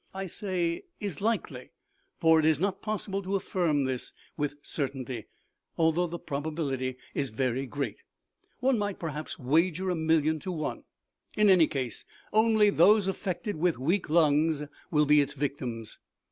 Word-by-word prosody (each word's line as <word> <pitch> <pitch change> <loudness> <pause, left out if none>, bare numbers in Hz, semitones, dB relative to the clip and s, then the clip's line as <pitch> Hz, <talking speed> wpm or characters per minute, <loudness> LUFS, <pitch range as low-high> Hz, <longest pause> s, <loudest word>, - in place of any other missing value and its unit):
I 195 0 -3
say 180 - -2
is 195 -7 -4
likely, 195 - -2 0.5
for 160 -1 +5
it 155 - +2
is 155 -2 +4
not 195 +1 -1
possible 205 -2 -2
to 195 +1 -2
affirm 170 -7 +1
this 130 -2 -3 0.2
with 145 -1 -2
certainty, 130 -5 -4 0.5
although 165 +2 +2
the 170 +1 -5
probability 140 -4 -3 0.2
is 140 -2 -1
very 130 +3 -1
great. 135 -6 -3 0.6
One 255 -2 +3
might 205 -1 -2
perhaps 155 -2 -5
wager 165 +7 +1
a - - 0
million 160 -1 +2
to 185 - -5
one. 155 -3 -4 0.5
In 210 -1 +5
any 175 -4 +6
case, 130 -5 -4 0.3
only 220 -1 +5
those 200 +4 +5
affected 195 +1 -3
with 170 +1 +1
weak 170 +8 0
lungs 155 -1 +3 0.3
will 150 -2 +3
be 150 0 +5
victims. 135 -5 -4
160 Hz, 145 wpm, -29 LUFS, 140-190 Hz, 0.6 s, any